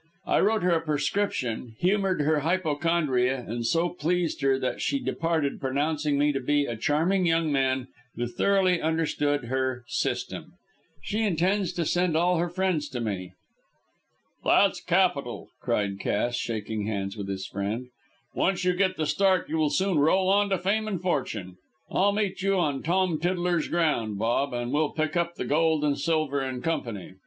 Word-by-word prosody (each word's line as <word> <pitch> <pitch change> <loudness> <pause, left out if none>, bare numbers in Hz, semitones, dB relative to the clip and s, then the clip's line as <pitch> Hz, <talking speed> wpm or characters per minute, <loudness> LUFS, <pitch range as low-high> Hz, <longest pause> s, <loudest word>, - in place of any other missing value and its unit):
I - - +2
wrote 215 0 +2
her 180 - +3
a 165 -1 +2
prescription, 140 - -1
humoured 190 - +1
her 150 +1 +2
hypochondria, 150 -6 +1
and 120 +2 -3
so 165 +8 +1
pleased 175 0 -1
her 135 -1 +3
that 130 -1 -3
she 280 - +1
departed, 165 - -1
pronouncing 145 +2 0
me 145 +1 +3
to 135 - -2
be 145 +2 +1
a 120 - -3
charming 165 - +1
young 165 -1 +2
man 130 -2 +1 0.3
who 120 - -2
thoroughly 185 +8 +2
understood 150 -3 0
her 130 0 -1
'system.' - - -3 0.5
She 215 +2 -2
intends 190 -1 +1
to 170 -2 -1
send 175 0 +1
all 175 +1 +3
her 175 +1 0
friends 180 -3 -1
to 125 - -4
me." 95 -5 -4 1.1
"That's - - +3
capital," - - 0
cried 100 -1 -1
Cass, 120 +5 0
shaking 110 -3 -3
hands 100 -2 -3
with 100 -2 -6
his 95 -1 -4
friend. 105 +6 -4 0.4
"Once 185 -1 0
you 180 - +3
get 185 0 +1
the 155 - 0
start 185 +5 +2
you 160 - -1
will 155 -1 +2
soon 190 -1 +1
roll 185 +6 +3
on 200 +1 +3
to 190 - +1
fame 205 +5 0
and 195 -5 -2
fortune. 115 - -2 0.3
I'll 200 +2 +3
meet 200 -2 -1
you 195 +1 +2
on 145 -6 0
Tom 175 -1 +1
Tiddler's 175 -1 0
ground, 135 -11 0
Bob, 120 +6 0
and 120 0 -3
we'll 150 +1 +1
pick 155 +2 -1
up 170 0 0
the - - -4
gold 160 0 +2
and 145 -1 +2
silver 155 -3 0
in 130 -2 -4
company. 115 - -3
155 Hz, 170 wpm, -26 LUFS, 130-180 Hz, 1.1 s, her